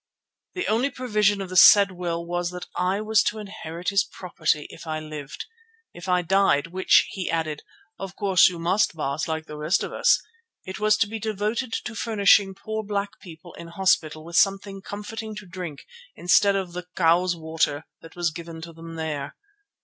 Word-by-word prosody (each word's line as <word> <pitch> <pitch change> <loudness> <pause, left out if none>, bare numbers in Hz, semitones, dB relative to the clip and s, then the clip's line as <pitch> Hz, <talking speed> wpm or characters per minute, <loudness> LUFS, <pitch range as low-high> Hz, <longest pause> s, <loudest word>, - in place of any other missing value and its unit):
The 360 - -2
only 235 +6 +2
provision 210 -6 +1
of 190 - -6
the 185 - -6
said 200 +2 +8
will 170 -2 -4
was 175 0 -2
that 180 0 -7
I 185 +3 0
was 215 0 +3
to 210 +1 0
inherit 180 -4 -5
his 200 0 +3
property, 165 -5 -2
if - - -12
I 155 0 -2
lived. 155 -2 -7 0.5
If 175 +2 -8
I 180 0 +2
died, 190 -5 +3
which, 185 +3 +3
he 190 -2 -4
added, 160 -2 -2 0.4
"of 195 -1 -7
course 195 -3 +5
you 180 - -7
must, 175 +3 +1
Baas, 150 0 -2
like 160 -1 -3
the 150 - -9
rest 155 +6 +1
of - - -5
us," - - +4 0.5
it 190 +2 -7
was 215 0 +3
to 220 - +2
be 220 +2 -5
devoted 220 +3 -2
to 230 - -4
furnishing 205 -3 +3
poor 220 +2 -4
black 205 -1 -4
people 170 -1 -13
in 170 - -10
hospital 170 -3 0
with 170 +1 -3
something 195 0 +1
comforting 215 +2 -7
to 210 -1 -8
drink 175 -5 -8 0.3
instead 200 +3 +4
of 190 -3 -3
the 180 0 -6
"cow's 175 +1 +3
water" 160 -2 -1 0.2
that 165 - -14
was 175 -2 0
given 165 0 -8
to 165 0 -9
them 165 0 -10
there. 155 -4 -4
180 Hz, 190 wpm, -24 LUFS, 165-205 Hz, 0.5 s, said